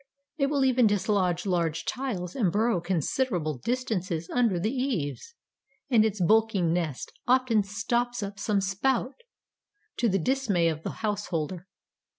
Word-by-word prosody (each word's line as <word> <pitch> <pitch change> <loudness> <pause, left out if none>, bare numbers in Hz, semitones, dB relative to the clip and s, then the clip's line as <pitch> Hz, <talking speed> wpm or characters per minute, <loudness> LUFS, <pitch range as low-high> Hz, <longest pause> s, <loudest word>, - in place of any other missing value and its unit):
It 275 - +3
will 280 -2 +1
even 250 -3 +4
dislodge 195 -3 +1
large 170 -4 0
tiles 210 -10 -3
and 205 -10 +2
burrow 215 -2 +1
considerable 175 - -1
distances 195 - -2
under 230 -8 +2
the 215 +6 0
eaves, 255 - -3 0.6
and 225 -3 +6
its 215 -2 -1
bulky 220 +3 +3
nest 165 -4 -1 0.2
often 250 -3 +3
stops 235 +4 -1
up 200 0 -6
some 205 -2 +1
spout, 240 +7 0 0.8
to 235 - +2
the 195 - +2
dismay 200 -5 +1
of 155 -1 -4
the - - -4 0.2
householder. 185 -4 -3
205 Hz, 140 wpm, -27 LUFS, 175-245 Hz, 0.8 s, and